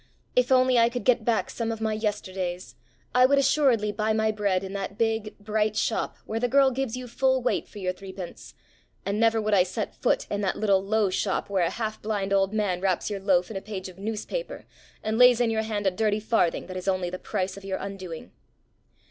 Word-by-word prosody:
If 250 +1 +3
only 255 -1 +5
I 230 0 +5
could 245 0 -4
get 250 -2 +3
back 230 0 0
some 230 -1 -2
of 225 - -4
my 220 -1 0
yesterdays, 190 -4 -3 0.4
I 250 0 +6
would 280 +1 +3
assuredly 260 -7 +3
buy 215 +1 0
my 220 0 +2
bread 200 -3 0
in 190 0 -6
that 200 0 -4
big, 220 -2 -1
bright 215 +1 -1
shop 220 +1 -1
where 225 - -3
the 245 - +1
girl 270 +1 +4
gives 255 -2 -2
you 255 0 -6
full 260 +2 +2
weight 250 - 0
for - - -14
your 185 -2 -2
threepence; 190 -1 -9 0.5
and 200 +2 -1
never 225 0 +3
would 215 -1 0
I 195 - +6
set 190 +4 -2
foot - - 0
in 205 - -1
that 195 - 0
little 195 -3 +2
low 210 -1 +1
shop 195 +1 -1
where 190 -3 +2
a 170 - +2
half 220 -2 -4
blind 205 -2 -1
old 195 0 +3
man 205 -5 0
wraps 190 +1 0
your 200 - -3
loaf 190 -1 +2
in 205 - -4
a - - -5
page 190 -3 -6
of 185 0 -14
newspaper, 225 - -4 0.4
and 220 +1 -1
lays 250 -1 +7
in 240 -2 +2
your 220 0 +1
hand 215 -2 -3
a 190 - +4
dirty 210 +2 0
farthing 215 -5 +1
that 185 - -7
is 185 - -6
only 185 -2 0
the 185 - -5
price 190 -3 -3
of 200 - -11
your 195 -1 -3
undoing. 185 -5 -7
210 Hz, 225 wpm, -26 LUFS, 195-225 Hz, 0.5 s, lays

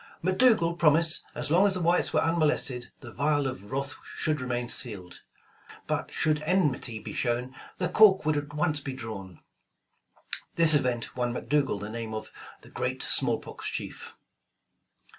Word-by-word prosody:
McDougal 185 -3 +3
promised 160 +1 +4
as - - -3
long 185 +5 +5
as 195 - +2
the - - -2
whites 175 +1 +2
were - - +2
un 165 +1 +1
molested, 145 -5 0
the 120 - -10
vial 145 +3 +1
of 105 -6 -6
wrath 135 0 -2 0.2
should 155 -3 -1
remain 120 -1 -2
sealed, 95 -10 -5 0.6
but - - -3
should 155 -1 +1
enmity 150 -9 0
be - - -8
shown, 125 +1 -1 0.2
the 180 - 0
cork 200 -5 +5
would 155 -1 +2
at 145 0 -3
once 150 -1 +1
be 135 -1 -5
drawn. 100 -8 -8 1.1
This 165 -2 +6
event 125 -5 0
won 120 -1 -1
McDougal 140 -6 0
the 105 - -6
name 110 0 -5
of 110 0 -7 0.3
the - - -15
''Great - - -3
Smallpox - - +2
Chief." - - -6
145 Hz, 160 wpm, -27 LUFS, 120-165 Hz, 1.1 s, This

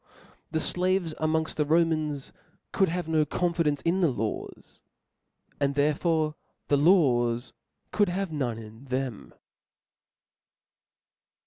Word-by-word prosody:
The 160 - -2
avcs 180 0 +1
amongft 160 0 0
the 150 - +1
Romans 155 -2 0 0.4
could 195 - +2
have 175 0 -3
no 160 -1 +3
con 175 +4 -1
fidence 150 -4 0
in 180 +3 +2
the 170 - +4
laws; 110 -4 -5 0.8
and 140 -1 +1
therefore 155 +2 +1 0.4
the 145 - +4
laws 130 -8 +3 0.4
could 205 -3 +2
have 190 0 -2
none 130 -7 -2
in 110 +3 -11
them. 130 - -4
155 Hz, 115 wpm, -27 LUFS, 135-170 Hz, 0.8 s, the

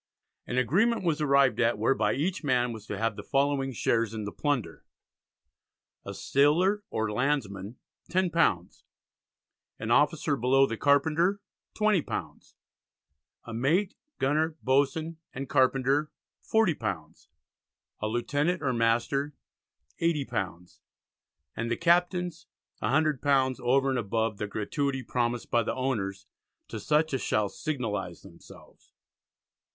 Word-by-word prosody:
An 125 - -3
agreement 195 - +2
was 160 -3 0
arrived 140 -2 +3
at 120 -1 +2
whereby 110 -1 +1
each 175 +7 -2
man 125 -4 +1
was 110 -1 -10
to 105 - -4
have 115 0 -1
the 105 - -6
following 135 +3 0
shares 115 -2 0
in 110 - -4
the 100 - -5
plunder. 145 -6 -2 1.2
A - - -7
sailor 175 +9 +2
or 110 -1 -2
landsman, 110 -4 -2 0.3
£10; 170 - +1 1.0
any 110 +1 -3
officer 145 +2 +3
below 135 +2 +4
the 115 - -3
Carpenter, 160 - +2 0.4
£20; 210 -6 -1 0.9
a 115 - -8
Mate, 160 - +1 0.2
Gunner, 155 +4 +1
Boatswain, 145 +5 +1 0.2
and 135 +1 -5
Carpenter, 135 +4 +2 0.4
£40; 110 - -1 0.7
a 105 - 0
Lieutenant 145 +10 -1
or 130 -2 +1
Master, 120 +5 0 0.7
£80; 115 - -2 0.8
And 115 +1 -3
the 115 - 0
Captains 175 0 +1 0.3
£100 140 -4 +2
over 135 +3 +2
and 130 - 0
above 110 0 -1
the 105 - -2
gratuity 135 +6 -2
promised 120 -1 -2
by 120 - +4
the 110 - -2
owners 105 -7 -2 0.4
to - - -5
such 155 0 +1
as 135 - 0
shall 105 -1 0
signalise 105 - -4
themselves." - - -17
135 Hz, 120 wpm, -28 LUFS, 115-155 Hz, 1.2 s, below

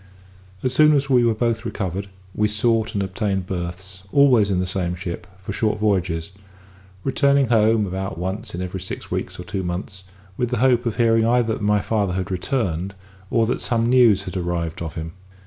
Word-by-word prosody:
As 130 - 0
soon 150 +2 +6
as 140 -1 0
we 125 -2 +5
were 115 -2 +2
both 115 0 0
recovered, 100 -3 -3 0.3
we 105 - +2
sought 110 +1 +1
and 100 - +1
obtained 95 -1 -2
berths, 90 +1 -5
always 125 -7 +5
in 95 -2 +1
the 90 - 0
same 90 -2 -2
ship, 85 -1 -6
for 95 +1 -6
short 110 +1 0
voyages; 95 -4 0 0.7
returning 140 -1 +2
home 110 -1 +4
about 95 -2 -4
once 95 +4 -4
in 90 - -3
every 90 0 -5
six 90 - -6
weeks - - -3
or - - -5
two 95 +2 -3
months, 95 +2 -5 0.3
with 125 - 0
the 125 - -1
hope 125 0 +3
of 115 - -2
hearing 115 -1 +3
either 120 -1 +2
that 110 - -5
my 105 0 +2
father 100 -5 0
had 95 +1 -3
returned, 95 -2 -2 0.3
or 115 -1 +2
that 120 - -1
some 115 -2 +1
news 120 -5 +5
had 95 0 -7
arrived 85 -3 -2
of 80 -1 -5
him. 80 0 -5
100 Hz, 195 wpm, -22 LUFS, 90-115 Hz, 0.7 s, soon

